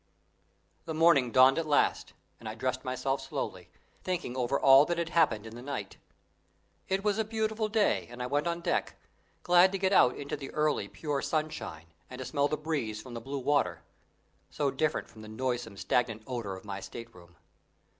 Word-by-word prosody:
The 160 - -4
morning 155 -6 +5
dawned 130 +5 +6
at 165 - -3
last, 145 - +1 0.3
and - - -7
I - - -6
dressed - - -2
myself - - -2
slowly, - - -5 0.3
thinking 175 -9 -3
over 130 +2 0
all 135 +1 +8
that 175 +1 -1
had 170 -1 -1
happened 115 -11 +2
in 110 - -9
the 120 - -9
night. 130 -7 -5 0.9
It 190 +1 -1
was 210 0 +1
a - - +3
beautiful 220 0 -1
day 215 -1 +1
and 120 +1 -10
I 125 - -2
went 145 +5 0
on 170 0 -2
deck, - - -1 0.5
glad 180 +1 +6
to - - 0
get 190 0 +1
out 125 - +5
into 145 0 -4
the 140 -2 -7
early, 150 0 +1
pure 145 -3 -3
sunshine, 155 - -3 0.2
and 125 - -8
to 130 - -6
smell 140 +3 +1
the 150 - -2
breeze 145 -9 -3
from 120 +2 -10
the 115 - -5
blue 135 +4 -5
water, 140 +2 0 0.7
so 145 -2 -1
different 155 +3 -1
from 110 - -14
the 110 - -10
noisome, 120 -2 -3
stagnant 115 0 0
odour 115 -6 -4
of 95 - -12
my 100 -1 -5
state 115 +5 -9
room. 90 -1 -17
140 Hz, 195 wpm, -30 LUFS, 120-165 Hz, 0.9 s, all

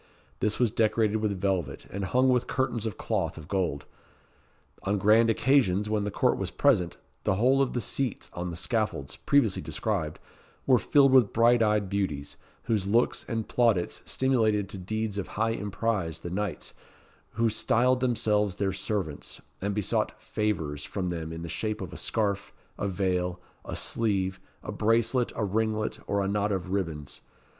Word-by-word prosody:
This 105 -1 +1
was 120 -4 +2
decorated 110 -1 +2
with 105 -3 -1
velvet, 90 -8 -1
and 100 0 -3
hung 130 +5 +3
with 125 -1 +2
curtains 120 -4 -1
of 110 - -5
cloth - - -2
of 75 -2 -9
gold. 90 -8 -1 1.0
On 100 +1 0
grand 110 +4 +5
occasions, 110 -5 +2
when 105 -1 +1
all - - -2
the - - -1
court - - +1
was - - -2
present, 100 -12 +2 0.3
the 95 - +2
whole 130 +6 +3
of 135 - +1
the 125 - 0
seats 125 +2 -2
on 90 +1 -4
the 85 - -5
scaffolds, 95 - -1
previously 130 -9 +2
described, 95 -9 -2 0.5
were 130 -3 +5
filled 135 +5 +4
with 130 -6 +5
bright 120 +1 +4
eyed 105 -2 +2
beauties, 95 -8 -2 0.3
whose 105 -4 0
looks 115 +4 +2
and 115 -3 -2
plaudits 115 -8 +1
stimulated 110 -7 +1
to 95 - -6
deeds 110 +2 -2
of 100 - -4
high 115 +1 +2
emprise 100 -4 -2
the 85 - -6
knights, 100 -4 -3 0.6
who 115 +1 +2
styled 125 +3 +2
themselves 105 -5 +1
their 95 -1 -1
"servants," 95 -5 -3 0.2
and 100 +1 -1
besought 105 -3 -1
"favours" 80 -9 -2
from 95 -3 -3
them 80 -2 -4
in 80 0 -6
the - - -5
shape 110 +5 -3
of - - -6
a - - -7
scarf, 100 -3 -1 0.2
a 100 - -2
veil, 90 -2 -1 0.2
a - - -6
sleeve, 95 -4 -1 0.2
a - - -5
bracelet, 115 +3 +2
a 115 - -1
ringlet, 110 +1 -1
or 100 0 +1
a - - -1
knot 105 +1 0
of 95 -1 -2
ribands. 80 -7 -3
105 Hz, 170 wpm, -28 LUFS, 95-115 Hz, 1.0 s, grand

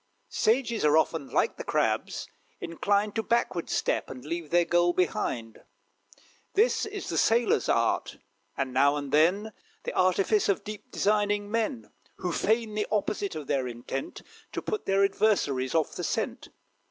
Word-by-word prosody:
Sages 235 0 +1
are 150 +1 +5
often, 160 -3 0
like - - +1
the - - -5
crabs, - - -1 0.3
inclined 200 +5 0
To 225 - 0
backward 220 -7 0
step, - - 0
and 130 0 -9
leave 165 0 -4
their 175 +1 +3
goal 175 +1 +3
behind. 120 -10 -2 0.9
This 435 +1 +3
is 405 -2 -6
the - - 0
sailor's 240 - +2
art, - - +1 0.4
and, 135 -2 -2
now 140 +2 +4
and 145 -2 -4
then, 190 +8 +3 0.3
The - - -4
artifice 190 +3 +2
of 200 - +1
deep, 210 -1 -8
designing 205 0 +1
men, 230 +2 -2 0.2
Who 180 - -3
feign 220 +4 +1
the 210 0 -1
opposite 205 -2 -1
of 155 -2 -5
their 135 -2 0
intent, 120 +3 -6 0.3
To - - -3
put 430 - -3
their 195 0 +3
adversaries 145 -11 +1
off 160 -2 +1
the - - -5
scent. - - -2
195 Hz, 155 wpm, -28 LUFS, 150-215 Hz, 0.9 s, are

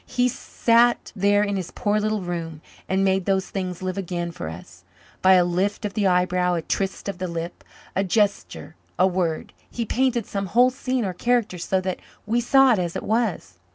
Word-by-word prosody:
He 250 0 +1
sat 240 -1 +2
there 205 +1 +3
in 200 -1 -1
his 185 -3 -4
poor 210 -2 0
little 215 0 -1
room 165 -3 -5 0.3
and 190 +1 +2
made 190 -1 +1
those 190 -1 0
things 185 -2 -4
live 185 +1 -2
again 175 -2 -3
for 80 - -6
us. 90 +2 -11 0.4
By 190 0 +6
a 180 -1 +5
lift 190 +5 -1
of 205 - -3
the 205 -2 +1
eyebrow, 180 0 +2
a 165 - -2
twist 195 +4 -2
of 195 -2 -4
the 185 - -2
lip, 170 0 -6 0.3
a 195 - +2
gesture, 200 -4 -1 0.2
a 185 - +5
word, 175 -4 -1 0.2
he 235 - -3
painted 245 -1 0
some 195 -1 -3
whole 245 +6 +4
scene 255 -2 -2
or 185 - -2
character 230 -1 0
so 190 +2 0
that 185 -1 -3 0.3
we 230 +3 +1
saw 270 +1 +5
it 210 - 0
as 175 -2 -2
it - - -3
was. 210 - -1
190 Hz, 200 wpm, -23 LUFS, 180-215 Hz, 0.4 s, By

